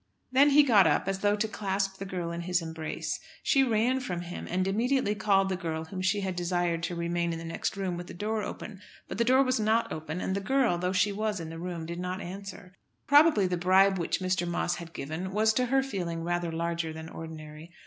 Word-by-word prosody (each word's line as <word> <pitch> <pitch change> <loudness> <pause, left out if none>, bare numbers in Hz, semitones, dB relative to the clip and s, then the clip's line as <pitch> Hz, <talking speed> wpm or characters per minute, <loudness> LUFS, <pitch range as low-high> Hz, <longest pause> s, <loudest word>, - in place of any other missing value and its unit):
Then 275 +3 +6
he 290 +1 +7
got 210 - +6
up, - - +1
as 195 0 -1
though 205 +1 +2
to 210 +1 0
clasp 195 -2 -2
the 195 - -4
girl 175 -3 -3
in 170 0 -4
his 180 +1 +1
embrace. 160 -1 -4 0.2
She 275 - +4
ran 245 +2 +2
from 180 -9 -4
him, 175 0 -7
and 185 +1 0
immediately 230 +2 +1
called 200 -2 +2
the 190 - -1
girl 160 -3 -4
whom 185 +3 -6
she 195 +2 +1
had 190 -2 -2
desired 175 -1 0
to 175 - -4
remain 170 0 -1
in 165 - -3
the 165 - -7
next 165 +4 -3
room 185 -3 -2
with 175 0 -7
the - - -9
door 215 +3 -2
open. 205 -1 -7 0.3
But - - -6
the - - +5
door 260 +3 +5
was 255 -2 +1
not 220 +2 +1
open, 155 +2 -5
and 190 - -2
the 200 - -1
girl, 240 -5 +2
though 180 +1 0
she 190 +2 +2
was 210 0 -2
in 165 -1 -6
the 165 - -7
room, 170 -2 -5
did 170 +1 -5
not 180 +1 -3
answer. 190 0 -8 0.3
Probably 290 -8 +6
the 180 -1 0
bribe 190 +2 +4
which 170 +2 -1
Mr. 185 -1 0
Moss 175 0 -1
had 170 -1 -8
given 160 +7 -5
was 220 +1 +3
to 250 +2 +1
her 270 +2 +3
feeling 175 -10 -3
rather 175 0 -1
larger 165 0 -2
than 160 0 -8
ordinary. 160 0 -9
185 Hz, 235 wpm, -29 LUFS, 170-210 Hz, 0.3 s, he